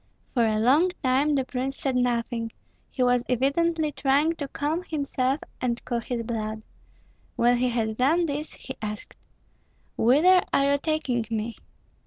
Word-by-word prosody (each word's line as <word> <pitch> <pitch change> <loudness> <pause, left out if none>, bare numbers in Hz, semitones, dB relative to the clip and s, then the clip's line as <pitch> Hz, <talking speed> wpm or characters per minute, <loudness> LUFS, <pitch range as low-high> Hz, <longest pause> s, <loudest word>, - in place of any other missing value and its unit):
For 240 - +3
a 220 -1 +2
long 275 +11 +4
time 270 +3 +2
the 265 -2 0
prince 265 +1 -3
said 270 -2 -1
nothing; 235 -2 0 0.4
he 255 - -1
was 245 -1 +3
evidently 305 +5 +1
trying 290 +4 +2
to 285 - -4
calm 300 +5 -2
himself 280 -4 -1 0.2
and 240 -2 0
cool 240 -1 -1
his 235 0 -4
blood. 220 -2 -4 0.7
When 240 +1 +3
he 250 +1 +1
had 220 -2 -1
done 310 +8 +3
this 300 0 -4
he 265 - -8
asked, 210 -1 -6 0.8
"Whither 325 +10 +5
are 275 0 +3
you 285 - +3
taking 275 -7 -1
me?" 225 0 -3
255 Hz, 155 wpm, -26 LUFS, 235-290 Hz, 0.8 s, Whither